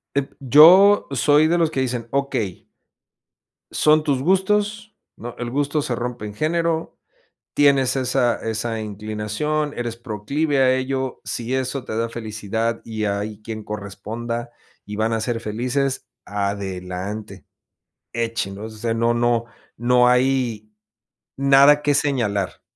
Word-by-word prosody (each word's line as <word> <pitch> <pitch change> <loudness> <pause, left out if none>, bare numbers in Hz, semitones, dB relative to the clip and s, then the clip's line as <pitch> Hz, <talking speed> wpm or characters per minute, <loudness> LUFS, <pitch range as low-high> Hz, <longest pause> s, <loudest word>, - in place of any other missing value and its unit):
Em, 140 -1 0
yo 170 - +7
soy 145 +4 +3
de 175 +1 +2
los 165 -2 +2
que 135 - -2
dicen: 125 -3 -2
"Okey." 135 -9 -2 1.0
"Son 155 0 +4
tus 140 -4 0
gustos, 210 +5 0 0.2
no, 120 0 -8
el 120 -1 -4
gusto 145 +3 0
se 125 - -2
rompe 120 -2 -4
en 105 - -8
género, 165 +5 -1 0.6
tienes 140 -3 +3
esa 125 -2 +1
esa 115 0 -3
inclinación, 110 +8 -3
eres 120 -1 -4
proclive 135 +6 -2
a 130 -1 +4
ello, 130 0 -2
si 120 +2 -3
eso 130 0 -2
te 110 - -5
da 115 +1 0
felicidad 110 0 -3
y 110 -1 -4
hay 105 +1 -3
quien 110 0 -7
corresponda, 110 +4 -5 0.3
y 105 +1 -7
van 110 +1 0
a 115 - 0
ser 115 +1 -2
felices, 125 +5 -2 0.2
adelante. 100 -1 -4 0.7
Échenlos", 110 -2 -3
o - - -13
sea, 115 +1 -1
no, 115 +1 +1
no, 120 0 +1 0.3
no 125 +1 +4
hay 125 -4 +1 0.7
nada 140 +2 +5
que 145 -1 +2
señalar, 115 -10 -1
120 Hz, 135 wpm, -22 LUFS, 110-140 Hz, 1.0 s, yo